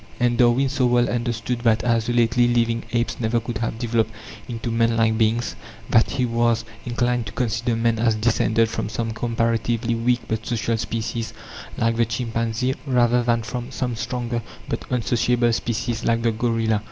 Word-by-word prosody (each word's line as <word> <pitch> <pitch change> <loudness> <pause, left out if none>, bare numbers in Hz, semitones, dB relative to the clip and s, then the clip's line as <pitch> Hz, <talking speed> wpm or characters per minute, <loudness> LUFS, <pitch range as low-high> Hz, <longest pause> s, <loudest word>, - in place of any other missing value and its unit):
And 120 -1 +2
Darwin 125 +2 +4
so 130 -1 +1
well 120 0 +3
understood 120 0 -2
that 115 -2 +2
isolately 120 +1 +2
living 115 -1 +1
apes 120 0 -1
never 115 0 +1
could 115 -1 -5
have 115 -1 -2
developed 115 -1 0 0.4
into 115 -1 -4
man 115 0 +2
like 110 -1 +3
beings, 110 0 +1 0.4
that 115 - +5
he 125 - 0
was 115 -1 +1 0.2
inclined 120 -1 0
to - - -6
consider 115 0 0
man 115 0 +1
as 115 -1 +3
descended 115 0 +2
from 110 - -3
some 115 0 -2
comparatively 115 0 0
weak 120 +1 +1
but 110 0 -2
social 115 -1 0
species, 115 +1 -3 0.4
like 115 0 +1
the 115 - +3
chimpanzee, 115 +1 -1
rather 125 -1 +3
than 120 -1 +1
from 120 +2 -5
some 125 -3 -3
stronger 120 +1 -3 0.3
but - - -3
unsociable 120 -1 +1
species, 115 0 -2
like 115 0 +1
the 115 - +3
gorilla. 115 -1 0
115 Hz, 165 wpm, -23 LUFS, 115-120 Hz, 0.4 s, that